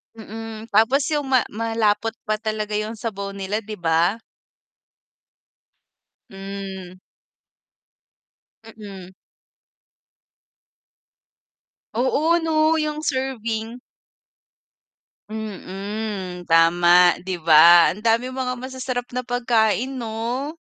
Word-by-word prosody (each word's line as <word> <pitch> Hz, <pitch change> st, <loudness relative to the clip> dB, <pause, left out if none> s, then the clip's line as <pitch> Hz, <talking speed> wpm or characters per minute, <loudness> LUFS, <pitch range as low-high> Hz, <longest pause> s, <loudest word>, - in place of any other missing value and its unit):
Mm, 225 Hz, 0 st, -9 dB
tapos 225 Hz, +7 st, +3 dB
yung 295 Hz, -2 st, -1 dB
ma 260 Hz, -2 st, +3 dB
malapot 225 Hz, 0 st, 0 dB
pa 215 Hz, 0 st, -2 dB
talaga 215 Hz, -1 st, -3 dB
yung 215 Hz, +1 st, -3 dB
sabaw 200 Hz, -3 st, -5 dB
nila 200 Hz, +2 st, -4 dB
'di 215 Hz, -, -6 dB
ba? 170 Hz, +7 st, +1 dB, 2.1 s
Hmm. 195 Hz, -1 st, -8 dB, 1.7 s
Mm. 200 Hz, -4 st, -11 dB, 2.8 s
Oo 305 Hz, +8 st, +1 dB
'no, 315 Hz, 0 st, +2 dB
yung 305 Hz, 0 st, -3 dB
serving. 235 Hz, -3 st, -3 dB, 1.5 s
Mm, 200 Hz, -2 st, -6 dB
tama, 175 Hz, +2 st, +5 dB
'di 185 Hz, -2 st, -4 dB
ba 165 Hz, +2 st, +8 dB
ang 210 Hz, -, -13 dB
daming 235 Hz, +3 st, +1 dB
mga 255 Hz, -1 st, -2 dB
masasarap 255 Hz, -1 st, -4 dB
na 250 Hz, -, -2 dB
pagkain 245 Hz, +1 st, 0 dB
'no? 240 Hz, +4 st, -4 dB
220 Hz, 85 wpm, -22 LUFS, 195-245 Hz, 2.8 s, ba